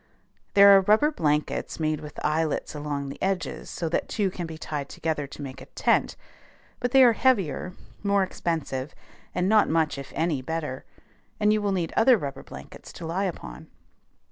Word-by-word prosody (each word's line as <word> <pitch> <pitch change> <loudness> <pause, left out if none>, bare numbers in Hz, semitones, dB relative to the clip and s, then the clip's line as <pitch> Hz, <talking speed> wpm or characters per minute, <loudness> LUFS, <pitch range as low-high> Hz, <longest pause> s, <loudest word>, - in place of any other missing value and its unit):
There 200 0 +9
are 195 - +6
rubber 215 +10 +4
blankets 150 - -1
made 155 -1 0
with 150 -1 -9
eyelets 155 0 0
along 145 -2 -4
the 140 - -9
edges 190 -1 -2
so 170 - -3
that 170 - -1
two 200 -4 0
can 175 -2 -5
be 160 -1 -8
tied 145 -3 -5
together 155 -3 -3
to 140 - -10
make 135 0 -8
a - - -11
tent; - - +1 0.6
but 245 - 0
they 265 +1 +6
are 240 -2 +7
heavier, 190 - +1 0.3
more 200 -1 +2
expensive, 155 -6 -3 0.4
and 180 - +1
not 215 0 +4
much 160 -3 +1
if 140 - -9
any 160 -4 0
better; 150 -2 -4 0.5
and 210 0 +4
you 215 - +1
will 205 -1 0
need 175 -4 -1
other 245 +2 +6
rubber 140 -6 -5
blankets 65 +1 -11
to 170 - -8
lie 180 +5 -1
upon. - - -6
165 Hz, 180 wpm, -26 LUFS, 150-200 Hz, 0.6 s, There